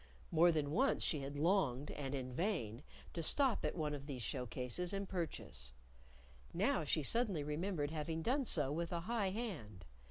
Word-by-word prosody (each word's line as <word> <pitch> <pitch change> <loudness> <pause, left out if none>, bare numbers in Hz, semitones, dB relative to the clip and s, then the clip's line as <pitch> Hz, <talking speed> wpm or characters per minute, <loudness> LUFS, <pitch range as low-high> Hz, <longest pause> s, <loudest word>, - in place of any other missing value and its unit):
More 170 +2 +6
than 150 -3 0
once 260 - +3
she 150 - +1
had 140 +1 -5
longed, 150 -5 +2
and 140 -1 -3
in 130 -2 -4
vain, 135 - -1 0.3
to 170 - -2
stop 260 - +3
at - - 0
one 155 -3 -1
of 140 -1 -6
these 130 -5 -4
show 125 - -2
cases 125 - -1
and 195 0 -2
purchase. 165 - -4 0.8
Now 195 - +2
she 155 +1 +1
suddenly 205 - +2
remembered 150 0 -1
having 160 +1 -2
done 265 - +2
so 150 - +3
with 165 +2 -2
a 170 -1 -1
high 210 0 0
hand. 160 - -5
160 Hz, 180 wpm, -38 LUFS, 140-190 Hz, 0.8 s, More